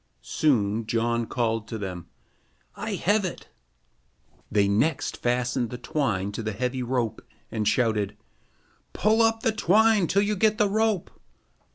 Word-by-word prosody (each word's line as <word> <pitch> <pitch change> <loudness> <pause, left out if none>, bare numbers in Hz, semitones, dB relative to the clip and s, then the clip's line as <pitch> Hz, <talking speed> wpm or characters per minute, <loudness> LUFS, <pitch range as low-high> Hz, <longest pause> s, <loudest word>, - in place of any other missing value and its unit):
Soon 110 - +1
John 115 0 0
called 115 -3 -1
to 110 - -5
them: 90 -5 -6 0.7
"I - - -3
have 205 +2 +2
it." 185 - -6 1.0
They 100 -1 +3
next 110 +11 +1
fastened 125 0 0
the 125 - -6
twine 110 -7 -1
to 105 - -5
the 110 -1 -3
heavy 125 +4 -2
rope 120 -3 -1 0.3
and 110 -2 -1
shouted: 105 -3 +1 0.8
"Pull 220 +2 +3
up 225 0 +2
the 225 - +3
twine 215 -1 +3
till 200 +4 +2
you 210 +1 0
get 215 +2 +2
the 210 -3 +3
rope." 215 -3 0
125 Hz, 145 wpm, -26 LUFS, -, 1.0 s, They